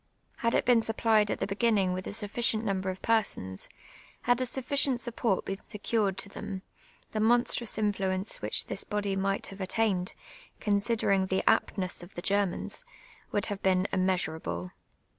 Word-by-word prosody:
Had 230 Hz, -2 st, +1 dB
it -, -, +2 dB
been 240 Hz, -2 st, +5 dB
supplied 220 Hz, -1 st, +2 dB
at -, -, -1 dB
the -, -, 0 dB
beginning 200 Hz, -2 st, +2 dB
with 185 Hz, 0 st, -4 dB
a -, -, -3 dB
suffi 210 Hz, +2 st, -3 dB
cient 225 Hz, -2 st, +3 dB
number 190 Hz, -3 st, -1 dB
of 185 Hz, 0 st, -6 dB
persons, 205 Hz, -, 0 dB, 0.5 s
had 245 Hz, +1 st, +3 dB
a 255 Hz, -, +1 dB
sufficient 265 Hz, 0 st, +1 dB
support 235 Hz, -4 st, -1 dB
been 195 Hz, +1 st, -4 dB
secured 210 Hz, -2 st, 0 dB
to 195 Hz, -, -4 dB
them, 195 Hz, -1 st, -6 dB, 0.5 s
the 215 Hz, -, -2 dB
monstrous 235 Hz, 0 st, +2 dB
intiuence 195 Hz, -2 st, 0 dB
which -, -, +1 dB
this -, -, -2 dB
body 205 Hz, -2 st, -1 dB
might 195 Hz, +1 st, 0 dB
have 195 Hz, -, -9 dB
attained, 190 Hz, -2 st, 0 dB, 0.4 s
considering 205 Hz, -2 st, +2 dB
the 190 Hz, 0 st, -1 dB
aptness 185 Hz, -2 st, +2 dB
of 175 Hz, +2 st, -12 dB
the 175 Hz, -, -4 dB
Germans, 200 Hz, -, +1 dB, 0.5 s
would 205 Hz, -, +1 dB
have 205 Hz, -1 st, -3 dB
seen 185 Hz, 0 st, +3 dB
immeasm 185 Hz, -4 st, +1 dB
able. 90 Hz, -, -5 dB
200 Hz, 165 wpm, -29 LUFS, 190-225 Hz, 0.5 s, been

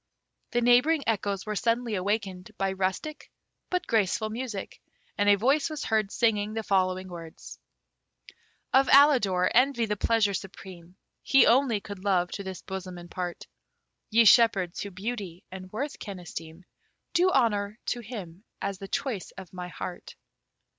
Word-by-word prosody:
The 240 Hz, -, 0 dB
neighbouring 250 Hz, +6 st, +4 dB
echoes 200 Hz, -3 st, -1 dB
were 215 Hz, 0 st, -3 dB
suddenly 230 Hz, +2 st, 0 dB
awakened 195 Hz, -1 st, -2 dB
by 195 Hz, 0 st, 0 dB
rustic, 190 Hz, +11 st, -3 dB, 0.4 s
but 360 Hz, 0 st, -1 dB
graceful, 215 Hz, 0 st, +1 dB
music, 230 Hz, -4 st, -6 dB, 0.3 s
and 205 Hz, 0 st, +2 dB
a 205 Hz, -, +7 dB
voice 275 Hz, +9 st, +2 dB
was 305 Hz, -2 st, -5 dB
heard 215 Hz, -2 st, 0 dB
singing 215 Hz, -2 st, +1 dB
the 225 Hz, -, -2 dB
following 185 Hz, -2 st, +1 dB
words: 170 Hz, -3 st, -10 dB, 1.1 s
Of 265 Hz, 0 st, +5 dB
Alidor, 245 Hz, -11 st, +5 dB
envy 250 Hz, -1 st, +3 dB
the 210 Hz, -1 st, -1 dB
pleasure 210 Hz, -1 st, +2 dB
supreme, 185 Hz, -2 st, -8 dB, 0.3 s
He 270 Hz, -, +5 dB
only 245 Hz, -3 st, +3 dB
could 200 Hz, -2 st, -9 dB
love 180 Hz, -3 st, +1 dB
to 200 Hz, -, -5 dB
this 190 Hz, -2 st, -7 dB
bosom 185 Hz, -2 st, -6 dB
impart; 175 Hz, 0 st, -6 dB, 0.6 s
Ye 230 Hz, +1 st, +5 dB
shepherds, 200 Hz, -6 st, +5 dB
who 200 Hz, -, -4 dB
beauty 195 Hz, -2 st, -6 dB
and 185 Hz, 0 st, -9 dB
worth 280 Hz, +7 st, -4 dB
can 200 Hz, -2 st, -7 dB
esteem, 165 Hz, 0 st, -9 dB, 0.5 s
Do 365 Hz, +1 st, +4 dB
honour 215 Hz, -, +1 dB
to 245 Hz, -, -2 dB
him 205 Hz, -6 st, -8 dB, 0.2 s
as 195 Hz, -1 st, -4 dB
the 195 Hz, -, -7 dB
choice 260 Hz, -4 st, -3 dB
of 190 Hz, -2 st, -10 dB
my 180 Hz, -1 st, -6 dB
heart. 180 Hz, 0 st, -7 dB
205 Hz, 150 wpm, -27 LUFS, 185-235 Hz, 1.1 s, a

